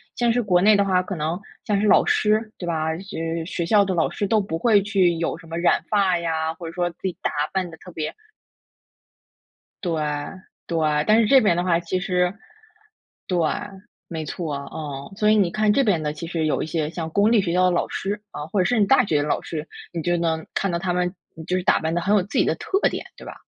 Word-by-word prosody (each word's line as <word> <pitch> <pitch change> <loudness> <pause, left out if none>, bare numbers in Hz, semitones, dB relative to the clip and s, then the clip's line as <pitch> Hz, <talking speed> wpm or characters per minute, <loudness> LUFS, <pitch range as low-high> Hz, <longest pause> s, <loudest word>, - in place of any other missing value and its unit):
像 240 -1 +2
是 245 +1 +1
国 180 -4 +2
内 215 +2 +6
的 200 - +3
话， 185 -2 +2
可 190 - -5
能， 160 +1 -2 0.3
像 205 -2 +1
是 - - +1
老 - - +5
师 215 +1 +2
对 175 - -6
吧？ 160 -1 -1
就 195 +4 -8
是 165 0 -3
学 170 0 -3
校 205 +3 +5
的 190 -1 -1
老 165 -2 +1
师 205 - -3
都 215 +2 +2
不 195 -5 -3
会 210 +3 +4
去 190 -4 +2
有 165 0 -2
什 165 -1 -15
么 165 - -5
染 170 +1 +2
发 195 -4 +3
呀， 160 -1 -1
或 165 +1 -10
者 165 - -5
说 175 0 -1
自 170 - -28
己 185 -2 -2
打 - - 0 0.2
扮 185 -2 -1
的 165 - -11
特 180 - -13
别 155 -2 -4 1.7
对 165 -4 -1 0.6
对， 165 -1 -1 0.3
但 215 +1 +5
是 220 - +2
这 270 +1 +6
边 175 -5 +3
的 175 - +1
话 170 -2 +3
其 175 +2 -2
实 180 -1 0 0.9
对， 180 - 0 0.7
没 160 -2 -5
错， 155 -1 -4 0.2
嗯， 145 -1 -6
所 210 0 +3
以 215 - +5
你 195 -5 +2
看 215 +1 +2
这 275 - +3
边 195 -9 +2
的， 150 -1 -2
其 165 - -7
实 165 -1 -2
有 155 - 0
一 - - -3
些 155 -1 -2
像 160 -1 -5
公 205 +6 +3
立 220 - +5
学 180 -3 -2
校 185 +1 +3
的 180 - +3
老 175 - 0
师， 205 +2 -3
啊， 150 - -6
或 190 +4 +1
者 - - +1
是 245 +2 +2
你 205 - +5
大 250 +4 +4
学 150 -6 +1
老 150 - -1
师， 155 -1 -6 0.2
你 170 - -3
就 175 +2 +1
能 165 -1 -1
看 195 - 0
到 170 - -1
他 180 0 -1
们 180 0 0 0.3
就 180 - +1
是 180 - -2
打 - - +3
扮 160 0 -2
的 175 - +1
很 200 +5 +2
有 205 - +4
自 205 - -5
己 - - +4
的 - - +1
特 390 - -1
点， - - -5
对 - - -12
吧？ - - -7
180 Hz, 270 characters per minute, -23 LUFS, 165-200 Hz, 1.7 s, 内